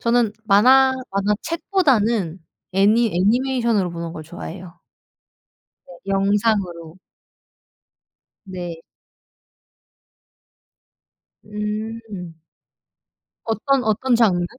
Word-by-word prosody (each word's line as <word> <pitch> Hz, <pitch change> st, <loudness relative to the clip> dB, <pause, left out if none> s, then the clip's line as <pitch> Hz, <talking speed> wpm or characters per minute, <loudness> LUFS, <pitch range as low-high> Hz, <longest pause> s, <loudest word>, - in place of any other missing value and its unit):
저는 235 Hz, -2 st, +2 dB
만화 260 Hz, +6 st, +5 dB, 0.2 s
만화책보다는 215 Hz, -, 0 dB, 0.3 s
애니 215 Hz, +4 st, +3 dB
애니메이션으로 230 Hz, -1 st, +1 dB
보는 170 Hz, -1 st, -6 dB
걸 155 Hz, -, -8 dB
좋아해요. 175 Hz, +1 st, -9 dB, 1.1 s
네 175 Hz, -, -13 dB
영상으로. 195 Hz, -4 st, 0 dB, 1.5 s
네. 175 Hz, -3 st, -6 dB, 2.6 s
음. 210 Hz, -4 st, -6 dB, 1.1 s
어떤 250 Hz, +4 st, 0 dB
어떤 230 Hz, +4 st, +1 dB
장르? 200 Hz, -7 st, +3 dB
210 Hz, 160 characters per minute, -21 LUFS, 180-235 Hz, 2.6 s, 만화